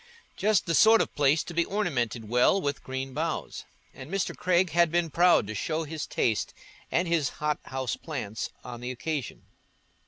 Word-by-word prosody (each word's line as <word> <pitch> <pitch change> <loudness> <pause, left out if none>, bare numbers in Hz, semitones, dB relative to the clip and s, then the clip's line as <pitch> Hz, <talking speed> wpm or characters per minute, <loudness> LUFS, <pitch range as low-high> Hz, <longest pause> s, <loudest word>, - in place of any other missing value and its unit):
Just 210 0 +2
the 170 - -1
sort 225 +5 +7
of - - -1
place 145 +2 +3
to 175 - -8
be 170 +1 +2
ornamented 125 - -2
well 125 - +3
with 145 -5 -2
green 130 0 -5
boughs, 160 +2 -3 0.3
and 130 - -10
Mr. 195 0 -2
Craig 180 -1 +2
had 170 0 +4
been 170 -2 +1
proud 175 -5 +4
to 110 - -5
show 160 +8 -2
his 155 -1 -5
taste 110 -3 -1 0.4
and 175 +2 +1
his 165 -4 +1
hothouse 135 -4 -2
plants 115 -9 -5
on 120 -1 -8
the 125 - -4
occasion. 135 +1 -4
155 Hz, 175 wpm, -27 LUFS, 130-170 Hz, 0.4 s, sort